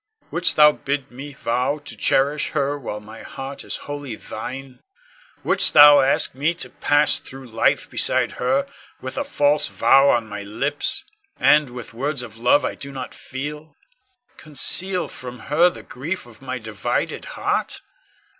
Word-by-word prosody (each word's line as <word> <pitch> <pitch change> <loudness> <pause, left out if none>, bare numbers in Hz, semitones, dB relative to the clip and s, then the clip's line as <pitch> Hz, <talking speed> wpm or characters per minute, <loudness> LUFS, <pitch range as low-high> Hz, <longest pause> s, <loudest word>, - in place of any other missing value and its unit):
Wouldst 175 +1 +1
thou 150 0 +7
bid 140 -2 -4
me 135 +4 -9
vow 125 +2 -1
to 145 - -9
cherish 145 +2 +1
her 140 0 0
while 120 -7 -6
my 110 +2 -12
heart 135 +1 -8
is - - -3
wholly 145 -5 -6
thine? 130 +5 -8 0.6
Wouldst - - +2
thou 145 -1 +9
ask 135 +1 +2
me 150 +6 0
to - - -5
pass 145 0 +2
through 135 0 -11
life 115 -2 +1
beside - - +1
her 275 +1 +1 0.3
with - - -7
a 285 - -1
false 150 - +2
vow 135 +1 +4
on 120 -3 +2
my 105 -1 -7
lips, 145 - 0 0.4
and, 150 0 +4
with 120 -2 -9
words 135 +2 -2
of 115 -2 -11
love 125 +5 +3
I - - -2
do 140 - -8
not 130 -2 -7
feel, 145 +3 -7 0.6
conceal 180 +5 +2
from 125 -1 -9 0.2
her 170 +4 +5
the - - -11
grief 160 +8 -5
of 120 -1 -17
my 130 -1 -4
divided 110 -3 -3
heart? - - -1
140 Hz, 160 wpm, -22 LUFS, 125-150 Hz, 0.6 s, thou